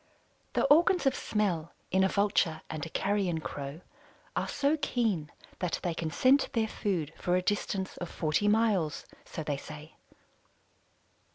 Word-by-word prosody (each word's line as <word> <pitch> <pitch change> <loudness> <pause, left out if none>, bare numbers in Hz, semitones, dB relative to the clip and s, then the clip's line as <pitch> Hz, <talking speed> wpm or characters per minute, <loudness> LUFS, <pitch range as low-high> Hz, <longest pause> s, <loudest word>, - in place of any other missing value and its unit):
The - - +2
organs 345 +3 +5
of 270 - +4
smell 185 -10 -1 0.2
in 190 +1 +4
a - - +5
Vulture 195 -5 +1
and 155 -2 -4
a 165 - -4
Carrion 195 -3 0
Crow 145 +1 -6 0.5
are - - 0
so 285 +2 +2
keen 225 - 0 0.3
that 180 -2 -1
they 175 - 0
can 165 -1 -3
scent 260 - +3
their 225 -3 +2
food 175 -8 -2
for 180 - +1
a 185 - +2
distance 195 -1 -1
of 175 - -5
forty 155 +6 0
miles, 210 -8 +2 0.2
so 160 - -5
they 145 -2 -1
say. 150 +2 -10
185 Hz, 155 wpm, -30 LUFS, 160-215 Hz, 0.5 s, organs